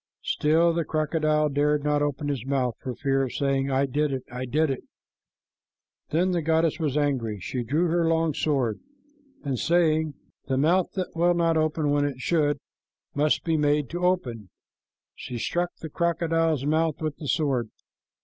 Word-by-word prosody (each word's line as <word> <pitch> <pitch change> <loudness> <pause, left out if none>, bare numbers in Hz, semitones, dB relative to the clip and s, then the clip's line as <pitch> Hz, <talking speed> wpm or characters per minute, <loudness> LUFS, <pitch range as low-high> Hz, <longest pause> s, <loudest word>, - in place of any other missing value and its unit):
Still 165 +3 +2
the 170 0 0
crocodile 155 -1 +1
dared 145 +1 +1
not 150 0 +1
open 145 0 -1
his 135 -5 -2
mouth 130 -2 0
for 130 -2 -5
fear 135 -1 0
of 130 -2 -2
saying, 135 -1 0
"I 135 +1 +2
did 145 +2 0
it, 130 -2 -3
I 125 +1 -4
did 150 +4 +1
it." 130 - -4 1.3
Then 180 +4 +1
the 175 -2 0
goddess 160 +1 +1
was 150 -3 0
angry. 130 -8 0
She 125 +7 -3
drew 150 +9 +1
her 170 0 +2
long 165 -1 +2
sword, 130 -8 0 0.6
and 135 -4 -2
saying, 160 -3 +2 0.3
"The 130 - 0
mouth 170 +6 +2
that 185 -3 -4
will 175 +1 +3
not 165 -1 +2
open 155 -1 +1
when 145 0 +2
it 140 -3 -3
should 145 0 +1 0.6
must 150 +1 +1
be 165 -2 +1
made 145 -2 +1
to 175 +1 -4
open," 125 - 0 0.6
she 125 -2 -7
struck 175 +9 -1
the 160 - -8
crocodile's 165 -3 0
mouth 155 0 +1
with 155 -2 -3
the 150 - -7
sword. 135 -7 0
150 Hz, 170 wpm, -26 LUFS, 135-165 Hz, 1.3 s, will